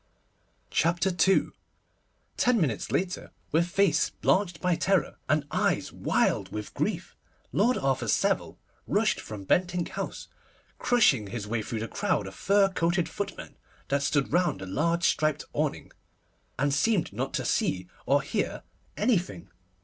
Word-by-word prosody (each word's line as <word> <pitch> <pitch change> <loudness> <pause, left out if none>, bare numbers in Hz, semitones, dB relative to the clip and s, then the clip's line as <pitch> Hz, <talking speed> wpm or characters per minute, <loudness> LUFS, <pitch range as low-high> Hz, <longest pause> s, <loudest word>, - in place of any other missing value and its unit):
CHAPTER 175 +4 +2
II 190 +2 +3 0.9
TEN 245 -2 +3
minutes 135 - -1
later, 185 0 -1 0.2
with 165 +3 +2
face 180 -3 +2
blanched 185 -4 +1
by 180 -2 +1
terror, 185 -4 +1
and 155 0 +2
eyes - - 0
wild - - 0
with 105 -2 -6
grief, - - -2 0.4
Lord 235 +6 +2
Arthur 130 -3 0
Savile - - +1 0.3
rushed - - +2
from 105 -2 -8
Bentinck 175 - +1
House, - - -5 0.5
crushing 140 - +3
his 105 +1 -5
way 110 +1 -2
through 110 +1 -4
the 115 - -3
crowd 105 - -1
of 95 - -8
fur 195 - +3
coated 175 -2 0
footmen 200 +5 -6 0.3
that 140 0 +1
stood 140 0 0
round 175 0 +2
the - - -5
large 165 - 0
striped 155 -3 +2
awning, - - -2 0.7
and 140 +1 +1
seeming 190 +6 +2
not - - -3
to - - -2
see 90 -1 0 0.2
or 140 +2 +3
hear 200 +8 -2 0.3
anything. 170 - 0
165 Hz, 140 wpm, -28 LUFS, 125-185 Hz, 0.9 s, II